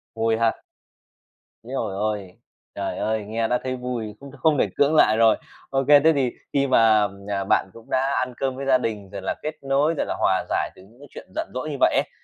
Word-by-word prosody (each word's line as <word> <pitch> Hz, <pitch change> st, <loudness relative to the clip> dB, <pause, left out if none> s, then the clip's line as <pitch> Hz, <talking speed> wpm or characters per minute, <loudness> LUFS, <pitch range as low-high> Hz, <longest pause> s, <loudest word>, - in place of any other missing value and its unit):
Vui 115 Hz, 0 st, +1 dB
ha. 115 Hz, -1 st, +2 dB, 1.1 s
Ối 125 Hz, -, -11 dB
giời 105 Hz, -7 st, -2 dB
ơi. 105 Hz, -3 st, -3 dB, 0.4 s
Trời 100 Hz, -1 st, -3 dB
ơi, 110 Hz, -1 st, -1 dB
nghe 115 Hz, +2 st, -1 dB
đã 125 Hz, +1 st, +1 dB
thấy 130 Hz, 0 st, -2 dB
vui, 120 Hz, -4 st, -5 dB
cũng 140 Hz, -1 st, -11 dB
không 155 Hz, +1 st, +2 dB
thể -, -, +2 dB
cưỡng 145 Hz, +2 st, +3 dB
lại 110 Hz, -7 st, +5 dB
rồi. 115 Hz, -1 st, +5 dB, 0.3 s
OK, 135 Hz, 0 st, 0 dB
thế 150 Hz, +2 st, +7 dB
thì 130 Hz, -3 st, +1 dB, 0.2 s
khi 140 Hz, -1 st, +2 dB
mà, 110 Hz, -4 st, +5 dB, 0.2 s
à, 100 Hz, -1 st, -1 dB
bạn 95 Hz, -, +1 dB
cũng 115 Hz, -1 st, -15 dB
đã 135 Hz, +1 st, +1 dB
ăn 125 Hz, 0 st, -2 dB
cơm 135 Hz, -1 st, -1 dB
với 135 Hz, +1 st, -5 dB
gia 130 Hz, -1 st, +5 dB
đình, 105 Hz, -5 st, -4 dB
rồi 100 Hz, -1 st, -7 dB
là 95 Hz, -, -2 dB
kết 155 Hz, +1 st, -3 dB
nối, 140 Hz, +4 st, +2 dB
rồi -, -, 0 dB
là -, -, -3 dB
hòa -, -, +2 dB
giải -, -, 0 dB
từ -, -, -16 dB
những 110 Hz, +6 st, -20 dB
cái 145 Hz, -, -13 dB
chuyện -, -, -11 dB
giận -, -, -2 dB
dỗi 130 Hz, +4 st, -4 dB
như 145 Hz, -, -4 dB
vậy -, -, +4 dB
ấy, -, -, +1 dB
120 Hz, 235 wpm, -23 LUFS, 110-135 Hz, 1.1 s, thế